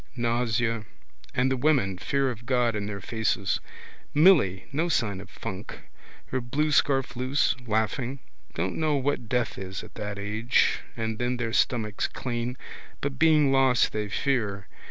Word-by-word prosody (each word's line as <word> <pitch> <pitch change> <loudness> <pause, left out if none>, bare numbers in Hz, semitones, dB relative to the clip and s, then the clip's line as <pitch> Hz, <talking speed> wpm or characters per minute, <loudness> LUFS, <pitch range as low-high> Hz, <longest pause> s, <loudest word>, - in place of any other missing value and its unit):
Nausea. 115 -2 0 0.5
And 130 +1 +2
the - - +2
women, 125 -10 +2
fear 135 +4 0
of 120 0 -10
God 125 -3 +2
in 100 -1 -2
their 100 -1 -5
faces. 110 -2 0 0.6
Milly, 145 - +5
no 160 +5 0
sign 105 - 0
of 100 - -12
funk. 105 -2 -7 0.5
Her 130 - -2
blue 150 +6 0
scarf 135 -3 +2
loose, 130 +4 +1
laughing. 110 +5 0 0.4
Don't 90 +3 -2
know 155 -2 +1
what 135 -4 -1
death 125 0 0
is 95 0 -6
at - - -12
that 105 -1 -5
age. 110 +4 +1 0.2
And 110 -1 -2
then 125 +1 0
their 115 -2 -2
stomachs 110 -5 +1
clean. 120 0 -4 0.4
But 135 -2 -3
being 155 -3 +5
lost 135 -2 +4
they 105 -1 -2
fear. 105 -5 -1
120 Hz, 155 wpm, -27 LUFS, 105-135 Hz, 0.6 s, Milly